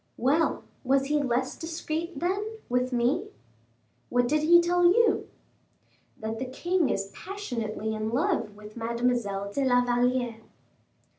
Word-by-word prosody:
"Well, 290 +7 +2 0.2
was 270 +1 +2
he 295 +1 +1
less 260 -1 0
discreet, 325 -1 -4
then, 410 +6 -2
with 250 +1 +1
me." 245 +1 +1 0.8
"What 245 0 +2
did 305 +3 +2
he 345 +3 +7
tell 350 +1 +2
you?" 450 +7 +4 0.9
"That 220 +1 -4
the 260 - -2
king 345 +6 0
is 195 0 -2
passionately 230 - -4
in 215 0 -2
love 280 - 0
with 210 0 -12
Mademoiselle 230 -4 -1
de 280 - 0
la 245 -1 +3
Valliere." 245 -1 +1
255 Hz, 135 wpm, -27 LUFS, 235-330 Hz, 0.9 s, he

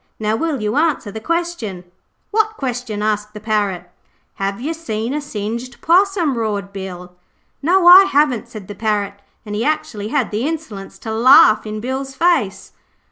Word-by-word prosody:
Now 215 0 0
will 295 -3 -2
you 210 +5 -1
answer 300 -9 0
the 220 - -6
question?' 325 - -3 0.5
'Wot 435 0 +1
question?' 245 -5 -3
asked 210 0 -2
the - - -6
Parrot. 205 -5 -1 0.5
'Have 195 +1 -3
yer 295 +7 -3
seen 235 -7 -4
a 300 - -2
singed 235 -1 -5
possum?' 350 - +2
roared 205 -3 -3
Bill. 180 -2 -8 0.5
'No, 350 +5 +3
I 365 +2 +10
haven't,' 285 - +1
said 210 -4 -10
the 205 - -7
Parrot, 205 -1 -1 0.3
and 210 - -6
he 210 +2 -1
actually 300 -9 -2
had - - -1
the 220 +6 -1
insolence 290 -12 -6
to 220 - -6
laugh 240 -1 +6
in 215 0 -5
Bill's 265 +2 -4
face. 285 - 0
230 Hz, 165 wpm, -18 LUFS, 210-310 Hz, 0.5 s, I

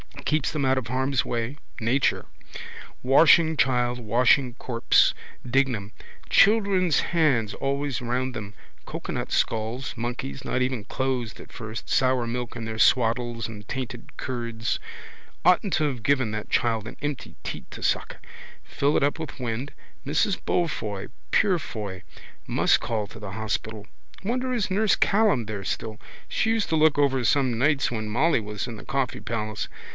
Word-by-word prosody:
Keeps 155 -2 +1
them 150 -2 -1
out 130 0 +3
of 125 -3 -2
harm's 130 +2 0
way. 120 +4 -2 0.2
Nature. 125 +5 +1 0.8
Washing 160 +4 +6
child, 125 -2 +2
washing 125 +3 +3
corpse. 120 -3 +3 0.3
Dignam. 125 -5 +1 0.4
Children's 195 -6 +4
hands 140 -11 +2
always 140 -1 -2
round 125 +2 -1
them. 105 -3 -6 0.3
Cocoanut - - -4
skulls, 115 +4 -1
monkeys, 115 - -4
not 130 - 0
even 125 -4 -1
closed 125 -2 -2
at - - -14
first, 110 -2 -7
sour 130 -2 +2
milk 120 +1 -4
in 115 - -5
their 110 0 -5
swaddles 115 -2 +2
and 105 -2 -10
tainted 125 -2 -6
curds. 115 -3 -3 0.6
Oughtn't 180 +2 +4
to 155 - +2
have 125 -4 -5
given 130 -2 +2
that 110 0 -5
child 115 -2 +1
an 115 - -8
empty 145 -3 -4
teat - - -6
to - - -8
suck. - - 0 0.5
Fill 145 +2 0
it - - +3
up 145 +3 +1
with 160 -3 -6
wind. 125 +3 -3 0.3
Mrs 160 +7 +1
Beaufoy, 110 - -1 0.2
Purefoy. 110 - 0 0.4
Must - - +3
call 110 -2 -2
to 115 - -12
the 105 -2 -7
hospital. 110 0 -3 0.4
Wonder 255 +4 -1
is 220 -6 -1
nurse 210 +2 +3
Callan 200 - +3
there 105 -2 -5
still. 110 -2 -3 0.3
She 225 - +1
used 225 -2 0
to 160 - +2
look 155 -1 +4
over 135 -2 +3
some 130 -2 +2
nights 140 0 +2
when 110 -2 -3
Molly 135 +8 +2
was 105 -1 -4
in 120 -3 -7
the - - -11
Coffee 135 -2 -1
Palace. 110 -2 -3
125 Hz, 155 wpm, -25 LUFS, 115-145 Hz, 0.8 s, Washing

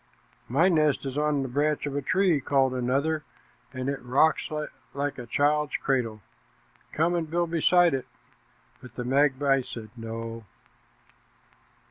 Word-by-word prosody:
"My 150 +9 +4
nest 155 -6 +2
is 135 -1 -4
on 150 -1 +1
the - - -3
branch 145 +4 0
of 145 -1 -4
a 145 - 0
tree," 180 0 +2
called 135 -1 +2
another, 140 +5 0 0.5
"and 130 0 -4
it 140 0 -2
rocks 135 +6 +2 0.5
like 140 -1 -2
a 120 - -8
child's 150 +3 +1
cradle. 115 -5 -1 0.7
Come 165 +3 +1
and 165 -2 -1
build 170 0 -1
beside 170 0 +4
it," 130 -2 -3 0.7
but 125 -2 -13
the 125 - -4
magpie 135 +1 +3
said 115 -4 -9
"No." 115 0 -6
140 Hz, 140 wpm, -27 LUFS, 125-155 Hz, 0.7 s, My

